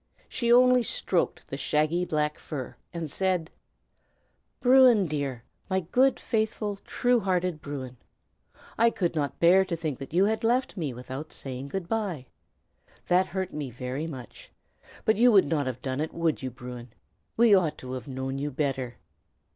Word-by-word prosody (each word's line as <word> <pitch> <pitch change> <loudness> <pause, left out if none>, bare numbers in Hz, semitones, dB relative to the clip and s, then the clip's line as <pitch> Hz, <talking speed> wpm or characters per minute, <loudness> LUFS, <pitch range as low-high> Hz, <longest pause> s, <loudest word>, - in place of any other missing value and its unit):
She 235 -2 -1
only 250 +1 +6
stroked 185 -5 -1
the 135 - -3
shaggy 155 +5 +1
black 150 -2 -1
fur, 130 -5 -6 0.2
and 170 -2 -4
said, 185 -3 0 1.1
"Bruin, 250 -5 +6
dear! 140 -6 -3 0.3
my 190 0 +1
good, 255 +10 +2
faithful, 215 -2 -1
true 245 0 +2
hearted 180 -5 -1
Bruin! 130 -4 -6 0.8
I 230 +1 +6
could 175 -7 -1
not 145 -3 -2
bear 180 +3 +6
to 185 -3 -3
think 155 -5 -4
that 135 - -8
you 180 +4 +4
had 220 +2 0
left 245 +3 +1
me 160 -8 -2
without 130 +5 -7
saying 135 0 -6
good 175 +4 -4
by. 195 - -2 0.8
That 180 +1 +4
hurt 190 0 -4
me 145 -3 -4
very 125 +5 -4
much. 130 -7 -10 0.5
But 220 - +3
you 245 +2 +6
would 200 -3 +6
not 145 -2 0
have 125 -1 -5
done 130 +1 -2
it, 155 - -4
would 165 -2 0
you, 130 - -3
Bruin? 125 0 -9 0.5
We 230 -2 +6
ought 180 -6 +3
to 130 - -8
have 130 +2 -6
known 135 0 -4
you 145 +1 -2
better." 135 -3 -2
160 Hz, 165 wpm, -27 LUFS, 135-195 Hz, 1.1 s, only